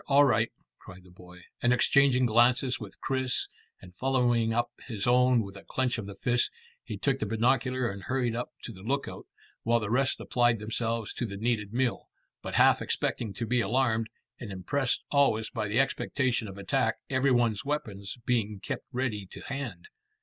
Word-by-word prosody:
All 145 +1 +6
right," 115 -3 +2 0.3
cried 95 -1 -13
the 90 - -17
boy, 90 0 -14 0.2
and 120 - +3
exchanging 130 0 +4
glances 125 +3 +3
with - - -10
Chris 130 -1 0 0.3
and 90 -1 -14
following 120 -3 +2
up 120 +1 0 0.2
his 110 -6 -3
own 125 -1 +4
with 100 -1 -9
a 100 - -11
clench 125 -2 -1
of 100 - -6
the 100 - -8
fist, 120 +4 +1 0.3
he - - -6
took 135 -2 0
the 105 - -2
binocular 125 +3 +1
and 100 0 -8
hurried 125 0 -1
up 120 - -3
to - - -6
the 95 -4 -12
lookout, 135 +7 -3 0.3
while 115 +1 +2
the 105 -1 -4
rest 130 +2 +2
applied 120 -1 +2
themselves 115 +1 -2
to 120 - -3
the 100 -1 -6
needed 110 -2 -1
meal, 125 +1 -1 0.3
but - - -5
half - - +5
expecting 110 -4 -1
to 115 - -2
be 120 +1 +2
alarmed, 115 0 +1 0.3
and 110 -4 -7
impressed 125 +8 -1
always 135 -6 +3
by 110 -3 -2
the 110 +5 +1
expectation 130 -3 0
of 100 -1 -9
attack, 100 -1 0
every 130 +1 +2
one's 120 -3 +2
weapons 110 -9 -3
being 110 -4 0
kept - - -5
ready 120 -6 -2
to - - -10
hand. 130 -11 -6
120 Hz, 185 wpm, -29 LUFS, 105-130 Hz, 0.3 s, All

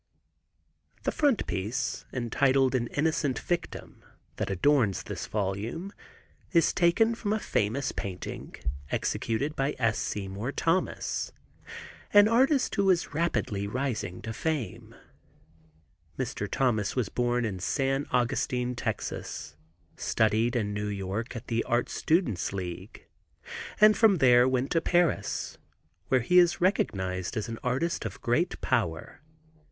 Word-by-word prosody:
The - - +1
frontispiece, 120 - 0
entitled 130 +2 +2
"An 120 -2 0
Innocent 145 -3 0
Victim," 175 -1 -4 0.3
that - - -2
adorns 105 - +2
this - - -6
volume 110 - -3 0.6
is 170 -3 +4
taken 195 +6 +3
from 220 -2 -3
a - - +1
famous 125 - -1
painting 95 -3 -6 0.3
executed 135 +7 -1
by 135 +2 0
S. 115 -3 +1
Seymour 100 +6 -3
Thomas, 170 +3 -1 0.8
an 205 0 +8
artist 260 +4 +3
who 200 -2 +2
is 175 -5 +2
rapidly 125 -11 -1
rising 120 -6 -3
to 110 - -4
fame. 150 -1 -3 1.2
Mr. - - -3
Thomas 110 -6 +1
was 125 -6 0
born 120 0 0
in 95 -4 -3
San 135 +8 0
Augustine, 125 0 0
Tex., 75 -10 -4 0.4
studied 110 +2 +1
in 105 -3 0
New 105 0 -2
York 100 +4 -4
at 115 - -6
the 115 -1 0
Art 120 +1 +1
Students' 155 - 0
League, 95 +1 -6 0.7
and 215 0 +7
from 215 -1 +5
there 125 -5 +6
went 130 +1 0
to 165 - +2
Paris, 175 0 0 0.5
where 130 -1 +3
he 180 +10 +5
is 175 -1 +4
recognized 95 - 0
as 110 - -2
an 115 -1 -6
artist 130 +7 0
of - - -6
great 160 +10 0
power. 95 -11 -1
125 Hz, 125 wpm, -28 LUFS, 105-165 Hz, 1.2 s, an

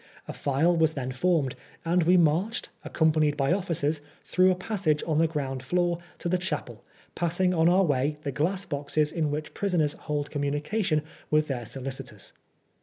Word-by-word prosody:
A - - -5
file 150 +5 +2
was 160 -1 +3
then 130 -3 -3
formed, 145 -1 +1 0.3
and 175 +2 +3
we 180 +2 +5
marched, 175 +7 +1
accompanied 155 -2 +2
by 135 +2 +2
officers, 165 -5 -1 0.2
through 185 0 +3
a 185 - +3
passage 180 -6 0
on 155 -2 +1
the 165 - +4
ground 135 -4 -3
floor 175 +5 0 0.2
to - - -4
the 180 +1 +1
chapel, 150 -10 -4 0.3
passing 175 +2 +1
on 165 -1 +4
our 185 +2 +4
way 145 -2 +1
the 140 - -2
glass 180 +7 -1
boxes 145 +1 0
in 160 -3 0
which 150 +1 -4
prisoners 170 -7 +1
hold 145 -1 -4
communication 150 +4 0 0.3
with 155 0 +3
their 125 -6 -4
solicitors. 130 -5 -7
155 Hz, 170 wpm, -27 LUFS, 145-175 Hz, 0.3 s, we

